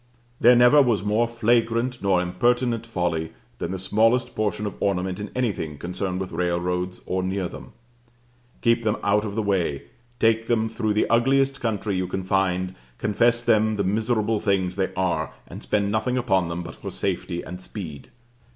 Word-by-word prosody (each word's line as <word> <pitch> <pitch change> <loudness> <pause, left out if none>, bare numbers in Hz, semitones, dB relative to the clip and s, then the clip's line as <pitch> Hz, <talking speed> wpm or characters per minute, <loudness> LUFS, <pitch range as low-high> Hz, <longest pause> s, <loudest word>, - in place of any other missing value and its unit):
There 120 +2 +7
never 125 +5 +7
was 115 -8 +2
more 105 +3 +2
flagrant 115 +1 +1
nor 95 -2 +2
impertinent 115 +5 0
folly 85 -6 -2 0.3
than - - -3
the 95 - -3
smallest 115 +6 +2
portion 105 -1 -1
of 100 - -3
ornament 95 -1 0
in 105 0 -5
anything 95 - -2
concerned 90 +3 -3
with 95 -1 -4
railroads 90 +1 -1
or 95 0 -1
near 95 0 -1
them. - - -11 0.9
Keep 115 0 +3
them 110 0 +1
out 105 +1 +2
of 100 -1 -5
the 110 - 0
way, 90 -8 0 0.4
take 115 0 +2
them 110 -2 +2
through 110 -2 -1
the 105 - +2
ugliest 135 +3 +2
country 105 -4 -1
you 90 0 -1
can 95 +1 -3
find, 95 -1 0 0.2
confess 120 - +2
them 110 -2 +3
the 100 - 0
miserable 110 +2 0
things 95 -4 0
they 95 -1 -1
are, 95 -1 -1
and - - -9
spend 100 -1 0
nothing 125 +4 0
upon 95 -9 +1
them 85 +1 -4
but 85 - -8
for - - -7
safety 90 -2 -3
and 90 +1 -8
speed. 85 -8 -8
105 Hz, 175 wpm, -24 LUFS, 90-115 Hz, 0.9 s, There